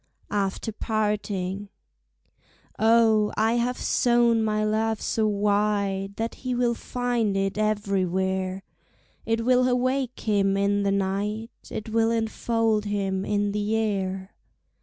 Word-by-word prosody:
After 200 +2 -1
Parting 205 -3 -2 1.1
Oh, 220 -1 +4
I 225 +2 +2
have 245 +1 0
sown 235 -2 +3
my 215 -1 0
love 220 0 0
so 220 -1 0
wide 200 -1 0
That 225 +2 -3
he 255 -1 -2
will 240 -1 +2
find 235 -4 -1
it 195 0 0
everywhere; 190 -3 -1 0.6
It 225 0 0
will 255 0 +4
awake 255 0 0
him 195 -2 +1
in 200 +1 +1
the 200 0 +1
night, 200 +3 -1 0.2
It 215 - -5
will 225 0 +2
enfold 225 -1 0
him 195 -2 -1
in 205 -1 0
the 210 +1 -1
air. 195 -3 -2
210 Hz, 120 wpm, -25 LUFS, 200-225 Hz, 1.1 s, Oh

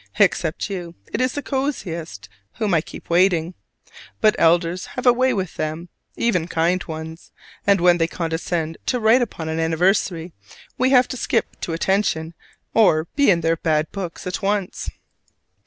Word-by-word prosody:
Except 175 -5 +2
you, 180 -4 -6 0.2
it 220 - 0
is 255 0 +1
the 290 - -4
coziest 185 - -3 0.3
whom 210 -4 -1
I 165 - +4
keep - - -11
waiting; 175 -1 +3 0.7
but 215 -1 +4
elders 170 +2 +2
have 250 - -3
a 245 - +7
way 255 +1 +2
with 190 -7 -3
them 155 +3 -4 0.3
even 180 -8 0
kind 175 +2 +1
ones: 160 0 -8 0.4
and 200 -1 +5
when 175 0 +4
they 165 - +2
condescend 165 -1 -3
to 250 - +1
write 225 +3 +5
upon 175 -9 -3
an 160 0 -2
anniversary, 170 +1 +1 0.4
we 255 +1 +2
have 255 -2 +5
to 255 - -4
skip - - -1
to 165 - -3
attention 170 -2 0 0.4
or 165 -8 +4
be 285 -3 +4
in 170 -3 +4
their 165 +1 +1
bad 155 -1 0
books 185 -4 -6
at 180 -1 -3
once. 200 -1 -1
175 Hz, 165 wpm, -22 LUFS, 165-210 Hz, 0.7 s, a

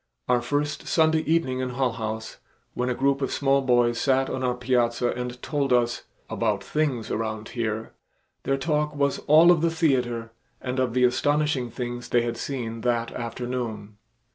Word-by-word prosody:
Our 125 -1 +3
first 145 +4 -2
Sunday 160 -1 +3
evening 130 -6 +1
in 130 0 -2
Hull 125 0 0
House, 110 -1 -5 0.4
when 125 +1 -1
a 125 - 0
group 140 +1 +1
of 135 - -1
small 140 -1 +2
boys 120 -2 +2
sat 135 -1 +2
on 130 - -3
our 125 -1 +1
piazza 120 -1 +1
and 125 0 -5
told 145 -3 -1
us 120 -1 +1 0.2
"about 105 -4 -1
things 140 -7 -1
around 110 -1 -3
here," 110 -2 -3 0.5
their 135 - 0
talk 150 +1 0
was 140 -1 +1
all 160 +4 +7
of 170 -3 +3
the 170 - +3
theater 125 -8 0 0.3
and 130 0 -3
of 125 -2 0
the 125 - +3
astonishing 145 0 +1
things 120 +1 -5
they 120 -1 +3
had 120 0 -2
seen 115 -5 -4
that 120 -1 0
afternoon. 115 -3 -5
125 Hz, 170 wpm, -25 LUFS, 120-140 Hz, 0.5 s, all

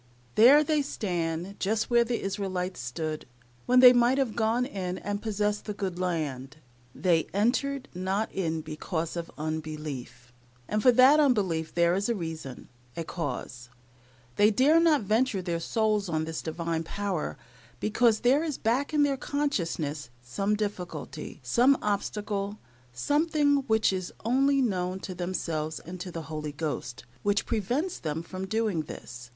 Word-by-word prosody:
There 270 - +7
they 305 -1 +1
stand, 175 - -3
just 220 +4 0
where 235 0 +5
the 235 0 -2
Israelites 190 -2 -3
stood, 155 +5 -4 0.4
when 250 +1 +6
they 250 -1 +10
might 245 +2 +4
have 265 -5 0
gone 235 +2 +1
in 185 -7 -4
and 205 0 -4
possessed 210 -1 -1
the 210 - -4
good 190 -3 -3
land. 150 -6 -3 0.4
"They 170 -4 +2
entered 270 +6 +1
not 190 +4 -1
in 165 -4 -2
because 160 +2 -4
of 170 -1 -4
unbelief," 150 -5 -5 0.3
and 215 0 0
for 250 - +7
that 260 +5 +7
unbelief 190 - +1
there 170 0 +4
is 200 +4 0
a 235 - +1
reason 160 - -6 0.3
a 165 - -2
cause. 125 -7 -5 0.7
They 210 - +6
dare 275 +9 +4
not 315 -6 +4
venture 220 +1 +1
their 175 -2 -2
souls 210 +1 0
on 160 -1 0
this 160 0 -4
Divine 165 0 -2
power, 195 -1 -3 0.4
because 220 +1 +2
there 270 +6 +4
is 305 -5 -2
back 260 +7 0
in 295 - +5
their 280 -1 +1
consciousness 170 - -2
some 195 - -1
difficulty, 205 -4 -5
some 260 +3 +4
obstacle, 205 0 -2 0.3
something 290 - +2
which 220 -3 +3
is 185 -1 -3
only 270 +3 +3
known 185 -4 -1
to 185 - -5
themselves 165 -3 -3
and 180 +3 -9
the 170 -2 -6
Holy 155 -1 -5
Ghost, 135 -7 -4 0.2
which 205 0 +1
prevents 245 - -1
them 155 +1 -3
from 185 +2 -6
doing 215 -5 0
this. 120 0 -9
195 Hz, 150 wpm, -28 LUFS, 160-235 Hz, 0.7 s, they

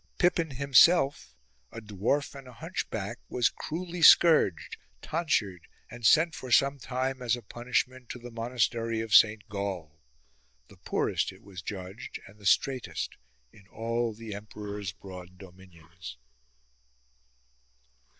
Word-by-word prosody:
Pippin 175 -2 +2
himself, 140 - +4 0.4
a - - -7
dwarf 110 +7 -1
and 135 -2 -11
a 125 - -12
hunchback, - - -5
was 125 - +2
cruelly 175 +2 -6
scourged, 155 - +6 0.3
tonsured, 110 - -1 0.2
and 120 0 -10
sent 160 +8 +5
for 130 -4 -8
some 140 +2 +4
time 130 +1 -3
as 120 -1 +1
a 120 - -10
punishment 125 +2 -2
to - - -6
the 120 0 -10
monastery 115 -1 -1
of 110 -1 -4
Saint 110 0 +5
Gall; 95 -7 -5 0.7
the - - -17
poorest, - - -1
it - - -18
was 95 -2 -9
judged, 95 +2 -7
and 100 +2 -16
the 100 - -4
straitest 130 +4 0 0.4
in 100 -2 -19
all 115 +2 -2
the 110 -1 -8
emperor's 105 -1 -6
broad 90 -1 -11
dominions. 90 -6 -13
115 Hz, 130 wpm, -28 LUFS, 100-130 Hz, 0.7 s, scourged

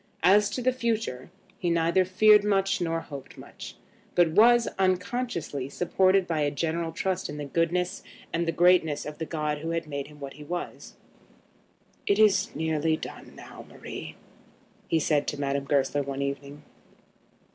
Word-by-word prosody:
As 205 +4 +5
to 250 - -4
the 255 +1 +2
future, 225 - -2 0.3
he 175 - -1
neither 170 +2 +2
feared 210 +3 +5
much 195 -2 +1
nor 165 -1 -1
hoped 140 -4 -10
much; - - -10 0.4
but 175 -2 +4
was, 235 +6 +5
unconsciously, 185 - -1
supported 185 +4 +2
by 165 -3 -2
a 145 -1 +2
general 165 +3 -2
trust 185 +2 -2
in 150 - -6
the 145 - -5
goodness 175 +5 -1 0.3
and 170 0 0
the - - +2
greatness 170 -3 +3
of 150 0 -7
the 160 - -4
God 150 -2 -2
who 165 +2 -5
had 165 -1 -2
made 140 -2 -5
him 150 0 -15
what 140 -1 -7
he 150 - -11
was. 175 +4 -6 1.1
"It 200 - +3
is 210 -1 +4
nearly 160 0 0
done - - -9
now, - - -11
Marie," - - -8 0.7
he 165 - +2
said 150 -1 +1
to 145 - -3
Madame 140 0 -1
Goesler 140 0 +1
one 140 0 -3
evening. 140 +1 -5
165 Hz, 165 wpm, -27 LUFS, 145-190 Hz, 1.1 s, As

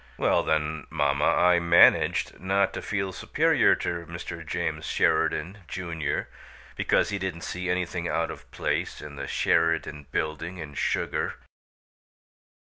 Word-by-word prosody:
Well, - - +3
then, 80 0 -1
mamma, 70 -2 +1
I 90 0 +4
managed 85 0 +4
not 95 +2 +1
to - - -4
feel 95 -2 -2
superior - - +3
to 85 -1 -4
Mr. 85 0 -7
James 75 - -3
Sheridan, 95 +7 +1
Junior, 85 -5 -3 0.5
because - - +2
he 100 - -2
didn't 95 -3 -4
see 90 +1 -4
anything 90 -1 -1
out 85 -1 -1
of - - -11
place - - -2
in 75 -1 -9
the 70 0 -5
Sheridan 80 -3 +1
Building 80 +4 -3
in 75 -4 -7
sugar." - - -1
85 Hz, 130 wpm, -26 LUFS, 80-90 Hz, 0.5 s, I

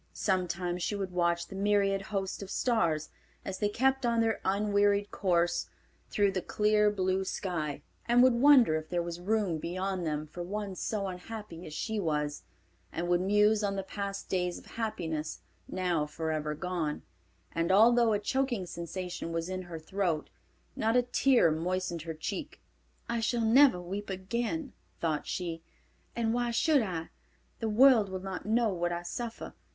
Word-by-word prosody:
Sometimes 180 -2 -1
she 205 - -1
would 195 -2 -3
watch 170 -1 +1
the 195 - -9
myriad 200 0 +2
host 195 -1 -3
of 195 - -7
stars, 170 -11 +1 0.4
as 190 - -4
they 205 - +1
kept 265 +5 +1
on 235 -1 +2
their 225 -1 +1
unwearied 205 +1 +2
course 175 -2 +1 0.4
through 200 -1 +2
the 185 -1 -2
clear, 210 +2 +3
blue 190 -2 0
sky, 170 -7 -3 0.2
and 240 +1 +6
would 255 -1 +6
wonder 250 - +6
if 155 0 -7
there 175 -1 0
was 170 0 -5
room 195 -3 0
beyond 185 +2 -2
them 155 -1 -2
for 155 +3 -8
one 200 +2 -4
so 200 +2 -2
unhappy 185 -1 -7
as 155 - -8
she 220 +5 -2
was, 150 -4 -1 0.5
and 175 +1 -3
would 175 0 +3
muse 210 +2 +3
on 200 -1 0
the 195 - -2
past 200 0 -5
days 180 -1 -1
of - - -13
happiness 160 -9 -3 0.3
now 175 -5 0
forever 155 -1 -2
gone, 170 -3 -3 0.5
and 165 +2 0
although 230 +3 +6
a 210 - +3
choking 240 -1 -1
sensation 175 0 -5
was 165 +1 -2
in 185 0 -3
her 175 -2 -7
throat, 170 -1 -2 0.4
not 225 +2 +2
a 250 - +4
tear 245 -6 +4
moistened 175 +1 -2
her 160 0 -5
cheek. 205 - -5 0.5
"I 235 0 -1
shall 230 +1 0
never 250 -3 +6
weep 195 +4 -5
again," 235 - -3 0.3
thought 155 -3 -1
she, 170 -3 -3 0.5
"and 230 -1 0
why 240 0 0
should 290 +4 +3
I? 175 -6 -3 0.5
The 225 - -1
world 230 -2 +6
will 190 0 -5
not 190 +1 -5
know 225 +1 +3
what 175 -1 -1
I 175 0 -3
suffer. 230 +6 -5
190 Hz, 165 wpm, -30 LUFS, 175-220 Hz, 0.5 s, and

